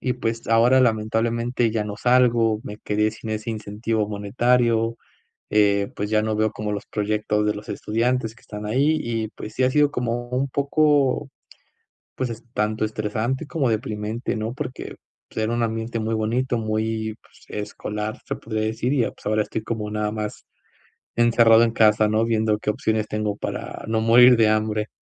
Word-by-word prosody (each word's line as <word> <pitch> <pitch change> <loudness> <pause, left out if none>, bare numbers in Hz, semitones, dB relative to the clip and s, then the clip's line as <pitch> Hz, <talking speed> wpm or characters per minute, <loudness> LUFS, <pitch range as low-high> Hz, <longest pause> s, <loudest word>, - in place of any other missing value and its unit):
Y, 125 - 0
pues, 115 0 -3
ahora, 120 +3 +5
lamentablemente, 115 +1 +1
ya 110 -1 -1
no 105 -1 -5
salgo, 120 -3 +3
me 105 -4 -7
quedé 105 +1 0
sin 110 0 -8
ese 110 +2 -3
incentivo 110 0 -2
monetario, 115 +2 +1 0.5
eh, 100 -1 +3
pues, 105 +1 -3
ya 110 -1 +3
no 110 0 -1
veo 110 0 +2
como 105 0 -4
los 100 - -4
proyectos 105 0 -1
de 105 - +1
los 105 - -9
estudiantes 115 +1 -1
que - - -22
están 105 0 -7
ahí. 140 +8 +2
Y 115 -2 -2
pues 110 - -9
sí 130 - 0
ha 130 - +3
sido 145 +1 +3
como 120 -1 -2
un 130 +2 0
poco, 140 0 +2 0.9
pues, 130 -2 -2
es 115 +1 -8
tanto 110 +1 0
estresante 110 +6 -2
como 145 -6 0
deprimente, 110 +1 -2
¿no? 110 +2 -3
Porque, 130 -1 -6 0.3
pues, 110 - -3
era 110 - 0
un 120 - 0
ambiente 115 +1 -2
muy 110 +1 -1
bonito, 120 +3 0
muy, 110 0 -2
pues, - - -22
escolar, 105 +1 -4
se - - -3
podría 110 -1 -3
decir, 115 +4 -1
y, 130 - +2
eh, - - -2
pues - - -21
ahora 110 0 +2
estoy 110 - -4
como 105 -2 -4
nada 105 0 -1
más 105 -1 -5 0.7
encerrado 115 -1 +6
en 115 - +2
casa, 110 -1 +4
¿no? 110 +1 +2
Viendo 110 -2 +1
qué 105 - -3
opciones 110 0 -1
tengo 105 -1 -1
para - - -5
no 110 0 +1
morir 120 +2 +7
de 110 - +5
hambre. 110 0 0
110 Hz, 180 wpm, -23 LUFS, 105-120 Hz, 0.9 s, morir